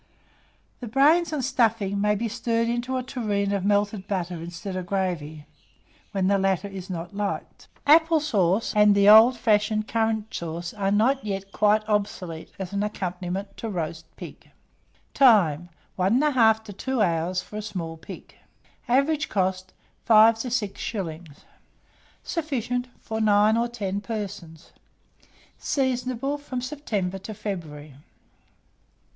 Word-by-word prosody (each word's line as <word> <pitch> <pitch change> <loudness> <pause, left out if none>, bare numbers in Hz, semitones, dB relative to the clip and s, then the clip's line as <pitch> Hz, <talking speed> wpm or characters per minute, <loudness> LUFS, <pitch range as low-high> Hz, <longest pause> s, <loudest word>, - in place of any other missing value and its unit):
The 245 - -7
brains 300 +9 +3
and 290 -4 -2
stuffing 225 -6 +1
may 210 0 +2
be 230 +3 -2
stirred 230 0 -1
into 240 +2 -2
a 255 - -2
tureen 210 -6 -2
of 200 -2 -1
melted 205 0 0
butter 180 -3 -2
instead 170 +3 -6
of 185 -1 -4
gravy, 170 -6 -3 0.7
when 195 -3 0
the 200 +1 +3
latter 195 0 0
is 195 -2 -8
not 180 +2 -6
liked. 205 -1 -4 0.2
Apple 320 +2 +5
sauce 205 - +1
and 210 -1 +5
the 200 0 +4
old 225 +4 +8
fashioned 215 -1 +1
currant 220 -1 -1
sauce 170 +1 -5
are 200 -2 -1
not 235 +7 +2
yet 195 -1 -4
quite 215 +1 +2
obsolete 195 -6 -2
as 190 -1 -6
an 200 - -1
accompaniment 190 -1 -4
to 225 - -5
roast 165 -4 -4
pig. - - -11 0.6
Time. 175 - +4 0.3
1 195 +7 +2
1/2 230 -7 +3
to 210 -2 -9
2 260 +6 -3
hours 175 0 0
for 210 - -9
a - - -3
small 180 -6 -5
pig. 160 - -11 0.5
Average 290 +5 +1
cost, 185 -1 -1 0.4
5s. 225 0 +6
to 255 - -4
6s. 190 - -4 0.8
Sufficient 250 -6 -2 0.2
for 220 0 -3
9 210 0 +4
or 235 +1 +1
10 205 -4 -4
persons. 200 -7 -7 0.9
Seasonable 260 0 -1
from 265 -3 -5
September 220 -9 -3
to 210 +3 -8
February. 155 -8 -6
210 Hz, 140 wpm, -25 LUFS, 185-235 Hz, 0.9 s, old